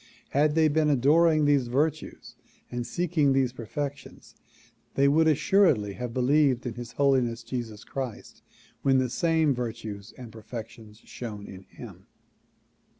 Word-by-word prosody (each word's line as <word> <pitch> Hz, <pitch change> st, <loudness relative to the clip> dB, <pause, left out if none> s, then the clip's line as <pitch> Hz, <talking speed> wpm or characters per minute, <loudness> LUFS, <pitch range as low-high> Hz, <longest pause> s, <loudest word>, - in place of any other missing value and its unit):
Had 150 Hz, +2 st, +2 dB
they 160 Hz, -1 st, +4 dB
been 155 Hz, 0 st, +2 dB
adoring 155 Hz, +3 st, +4 dB
these 140 Hz, -4 st, +3 dB
virtues 150 Hz, +5 st, -2 dB, 0.4 s
and 120 Hz, 0 st, -4 dB
seeking 160 Hz, -3 st, +1 dB
these 130 Hz, -2 st, +1 dB
perfections 140 Hz, +4 st, -7 dB, 0.6 s
they 140 Hz, +1 st, +4 dB
would 160 Hz, +3 st, +4 dB
assuredly 155 Hz, -, +3 dB
have 125 Hz, +3 st, -5 dB
believed 130 Hz, +1 st, +2 dB
in 120 Hz, -, -3 dB
His 120 Hz, +1 st, -8 dB
Holiness 125 Hz, -5 st, +1 dB
Jesus 115 Hz, -3 st, -6 dB
Christ 130 Hz, -5 st, -7 dB, 0.4 s
when 135 Hz, -1 st, +3 dB
the 130 Hz, -2 st, 0 dB
same 160 Hz, -2 st, +2 dB
virtues 110 Hz, -4 st, -6 dB
and 125 Hz, -3 st, -10 dB
perfections 110 Hz, 0 st, -10 dB
shone 105 Hz, -4 st, -7 dB
in 95 Hz, -1 st, -11 dB
him. -, -, -13 dB
130 Hz, 135 wpm, -27 LUFS, 115-150 Hz, 0.6 s, they